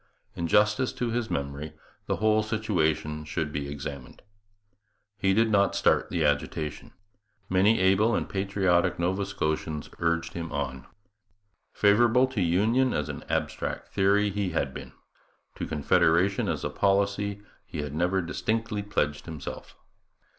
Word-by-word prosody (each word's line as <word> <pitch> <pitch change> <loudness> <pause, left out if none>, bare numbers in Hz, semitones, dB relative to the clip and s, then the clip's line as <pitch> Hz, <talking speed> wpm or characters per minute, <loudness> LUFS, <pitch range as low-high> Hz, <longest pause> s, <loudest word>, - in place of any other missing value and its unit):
In 85 - -2
justice 105 +7 +3
to 120 -2 -2
his 120 -1 -1
memory 70 +2 -4 0.3
the - - +1
whole 110 0 +3
situation 85 -8 -1
should 75 0 -3
be 70 -1 -3
examined. 70 -2 -7 1.0
He 95 -1 +2
did 110 +3 +3
not 100 -1 +3
start - - +2
the - - 0
agitation. 75 +1 -2 0.6
Many 95 +4 +4
able 95 +5 +3
and - - -1
patriotic 95 -3 +1
Nova 95 +3 -1
Scotians 80 -4 -3
urged 85 0 0
him 85 -1 -5
on. 65 -3 -4 0.9
Favourable 120 +5 +4
to 125 -6 -2
union 110 +10 +2
as 75 - -2
an - - -6
abstract - - -2
theory 100 +1 +2
he 100 -1 -1
had 70 -5 -1
been: - - -9 0.6
to - - -5
Confederation 85 +5 +2
as - - -2
a - - -2
policy 100 +1 0 0.2
he 75 - -4
had 75 -1 -6
never 90 +4 +1
distinctly 110 +4 -2
pledged 75 -8 -2
himself. 80 -2 -7
95 Hz, 140 wpm, -27 LUFS, 75-105 Hz, 1.0 s, Many